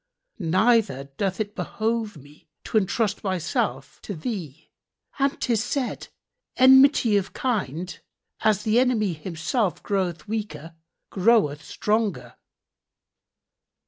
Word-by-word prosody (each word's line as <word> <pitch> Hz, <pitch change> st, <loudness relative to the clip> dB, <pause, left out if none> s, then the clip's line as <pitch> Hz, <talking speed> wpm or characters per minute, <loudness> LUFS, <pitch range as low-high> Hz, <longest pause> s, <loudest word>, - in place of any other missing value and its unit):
Neither 185 Hz, -, +2 dB
doth 195 Hz, -1 st, -1 dB
it 210 Hz, -1 st, -3 dB
behove 220 Hz, -3 st, -2 dB
me 145 Hz, +2 st, -18 dB
to 220 Hz, -, +2 dB
entrust 205 Hz, +1 st, -1 dB
myself 190 Hz, -, -2 dB
to 205 Hz, -, -6 dB
thee; 165 Hz, -, -6 dB, 0.5 s
and 275 Hz, 0 st, +1 dB
'tis 225 Hz, -3 st, +1 dB
said, 255 Hz, 0 st, -3 dB, 0.5 s
'Enmity 260 Hz, -4 st, +6 dB
of 200 Hz, -1 st, -3 dB
kind, 185 Hz, -, -2 dB, 0.4 s
as 210 Hz, -1 st, +2 dB
the 220 Hz, +2 st, +3 dB
enemy 225 Hz, -7 st, +2 dB
himself 175 Hz, -, -2 dB
groweth 180 Hz, -6 st, -2 dB
weaker 205 Hz, -7 st, -5 dB, 0.4 s
groweth 190 Hz, -8 st, +2 dB
stronger.' 210 Hz, +6 st, -1 dB
205 Hz, 105 wpm, -24 LUFS, 170-230 Hz, 0.5 s, Enmity